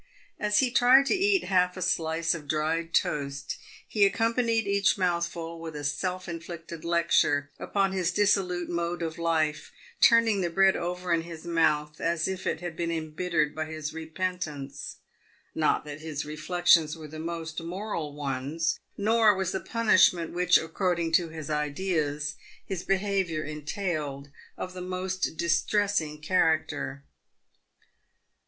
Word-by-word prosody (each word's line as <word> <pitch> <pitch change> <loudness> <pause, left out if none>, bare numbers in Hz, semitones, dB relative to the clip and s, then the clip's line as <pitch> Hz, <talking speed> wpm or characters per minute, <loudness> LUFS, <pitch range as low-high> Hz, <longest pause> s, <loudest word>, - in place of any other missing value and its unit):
As 210 -1 +1
he 255 -2 +1
tried 255 +2 +6
to - - +2
eat 390 -1 +3
half 180 -1 +2
a - - -5
slice 165 -1 +1
of 155 -3 -7
dried 160 +2 -1
toast 140 -4 -1 0.3
he 210 - +2
accompanied 230 +2 +2
each 200 0 +2
mouthful 170 -2 -1
with 165 -2 -7
a. 145 - -5
self 185 +6 -2
inflicted 170 -1 -7
lecture 160 -4 +2
upon 195 -1 0
his 185 -2 0
dissolute 195 -4 +1
mode 170 0 -2
of 160 0 -4
life, 160 -2 0 0.3
turning 230 -4 +5
the 175 - 0
bread 195 +2 +4
over 180 0 -2
in 165 - +2
his 165 0 -9
mouth 155 -3 +1
as 165 -1 0
if 190 -1 -4
it 160 - -1
had 175 -2 -5
been 170 0 -2
embittered 160 -1 -1
by 155 0 -3
his 155 -1 -5
repentance. 160 -3 -4 0.6
Not 155 -1 +1
that 150 +1 -8
his 155 -2 -4
reflections 155 +1 +2
were 155 -1 -9
the 155 +1 -9
most 165 0 -4
moral 170 -4 -4
ones, 145 +3 -2 0.2
nor 220 0 +4
was 190 -1 -1
the 190 - -2
punishment 185 -8 +3
which, 180 0 +5
according 170 0 -1
to 165 0 +3
his 155 -1 -7
ideas, 150 -1 -1 0.3
his 190 -3 -4
behaviour 190 -5 0
entailed, 150 -2 -4 0.3
of 185 - -5
the 185 - -7
most 185 -1 -3
distressing 170 -1 +1
character. 155 -5 0
170 Hz, 145 wpm, -28 LUFS, 155-185 Hz, 0.6 s, tried